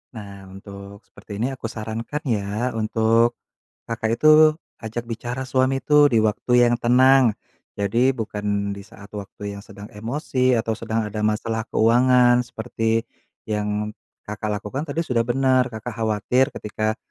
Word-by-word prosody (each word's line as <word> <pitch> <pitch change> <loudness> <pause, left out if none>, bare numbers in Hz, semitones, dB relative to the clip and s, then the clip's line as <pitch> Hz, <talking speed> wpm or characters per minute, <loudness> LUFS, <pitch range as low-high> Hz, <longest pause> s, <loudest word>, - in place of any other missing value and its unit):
Nah, 100 -3 -10
untuk 100 +1 -11
seperti 100 - -11
ini 125 +5 -1
aku 120 -3 -6
sarankan 115 +6 -5
ya, 110 +1 -1
untuk 115 +2 +2 0.5
Kakak 115 0 -2
itu 155 +5 +6 0.5
ajak 115 +2 -5
bicara 120 +3 -4
suami 130 +1 +1
itu 150 -1 +5
di - - +4
waktu 110 +3 -1 0.2
yang 120 - +2
tenang. 130 0 +5 0.4
Jadi 115 +6 +2
bukan 105 -3 -3
di 100 - -9
saat 100 +1 -14
waktu 100 0 -7
yang - - -9
sedang 100 +1 -11
emosi 130 +3 0
atau 115 0 -1
sedang 115 0 -2
ada 105 0 -4
masalah 110 +1 -1
keuangan 120 +2 +4
seperti 115 -1 -2 0.4
yang 105 0 -2 0.3
Kakak 105 +1 -5
lakukan 120 +7 -4
tadi 155 +4 -1
sudah 120 -5 +1
bener, 130 +1 +2
Kakak 110 +2 -6
khawatir 110 +4 +1
ketika 110 +1 -3
115 Hz, 145 wpm, -22 LUFS, 105-125 Hz, 0.5 s, itu